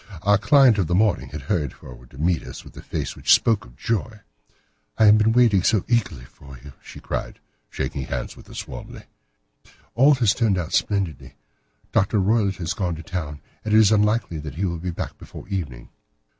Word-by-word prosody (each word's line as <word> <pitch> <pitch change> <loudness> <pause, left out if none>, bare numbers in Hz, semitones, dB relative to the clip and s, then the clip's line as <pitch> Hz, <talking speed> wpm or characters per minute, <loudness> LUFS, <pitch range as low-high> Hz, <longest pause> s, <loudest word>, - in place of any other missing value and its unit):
Our 100 0 +4
client 130 -3 +5
of 90 - +1
the 85 - 0
morning 95 - +1
had 75 +1 -7
hurried 75 -1 -1
forward - - -14
to 65 - -16
meet 85 +2 +1
us - - -10
with - - -15
a - - -9
face - - -4
which - - 0
spoke 110 - +4
her - - -16
joy. 110 +4 -3 0.8
"I 110 - +5
have 105 +1 +7
been 110 +1 +3
waiting 115 -5 +4
so 105 +1 +1
eagerly 95 - -1
for 70 +1 -14
you," 70 -2 -11
she - - -12
cried, - - -5 0.3
shaking 65 - -4
hands 60 -1 -5
with - - -16
us - - -7
warmly. 60 - -9 0.9
"All 140 +4 +5
has 115 -5 +2
turned 110 -5 +1
out 85 -2 -4
splendidly. 95 -8 -1 0.6
Dr. 100 +3 +1
Roylott 100 0 +1
has 85 0 -3
gone 90 -4 -2
to 80 - -9
town, 80 -6 -5 0.2
and 110 0 +1
it - - +7
is 110 -1 +6
unlikely 105 -5 +1
that 75 -2 -8
he 95 +4 -1
will 85 -2 -3
be 90 +2 -4
back 85 - -6
before - - -11
evening." 70 -12 -5
95 Hz, 200 wpm, -23 LUFS, 75-110 Hz, 0.9 s, have